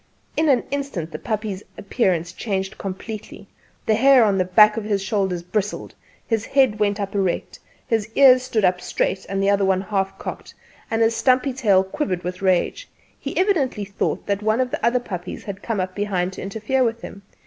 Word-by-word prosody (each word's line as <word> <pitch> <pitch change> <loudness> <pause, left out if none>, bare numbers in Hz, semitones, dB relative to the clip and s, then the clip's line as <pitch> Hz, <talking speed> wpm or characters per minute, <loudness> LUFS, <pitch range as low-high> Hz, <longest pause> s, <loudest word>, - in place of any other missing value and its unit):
In 315 -1 +2
an 260 -3 +3
instant 275 - -3
the 155 - -6
puppy's 215 -3 -3 0.2
appear¬ance 180 -5 -1
changed 195 -3 -3
completely: 200 +1 -7 0.4
the 220 - +3
hair 260 +2 +6
on 200 -3 +2
his 180 - +1
back 210 +3 +6
and 210 -2 -1
shoulders 195 -3 -1
bristled; 205 +3 -3 0.3
his 225 -2 0
head 260 -5 +2
went 205 0 +1
up 200 -1 -3
erect; 195 -3 -1 0.3
one 225 -2 +2
ear 260 -2 +7
stood 230 -5 0
up 180 0 +1
straight 190 - -2
and 195 0 -1
the 195 - +3
other 195 -1 +3
at 185 0 0
half 195 -2 -1
cock; - - -7 0.4
and 225 0 +2
his 225 +1 +2
stumpy 255 +2 +2
tail 205 -7 +3
quivered 190 - -3
with 180 +1 -5
rage. 190 - 0 0.3
He - - -5
evidently 290 - +1
thought 200 0 -2
that 200 0 -1
one 215 +2 +1
of 255 -1 0
the - - -4
other 235 +2 +3
puppies 180 -7 -6
had 200 -1 -7
come 225 -4 -2
up 185 0 -3
be¬hind 190 -3 -1
to - - -8
interfere 220 +7 -1
with 230 -1 -2
him. 200 - -9
205 Hz, 190 wpm, -22 LUFS, 190-235 Hz, 0.4 s, ear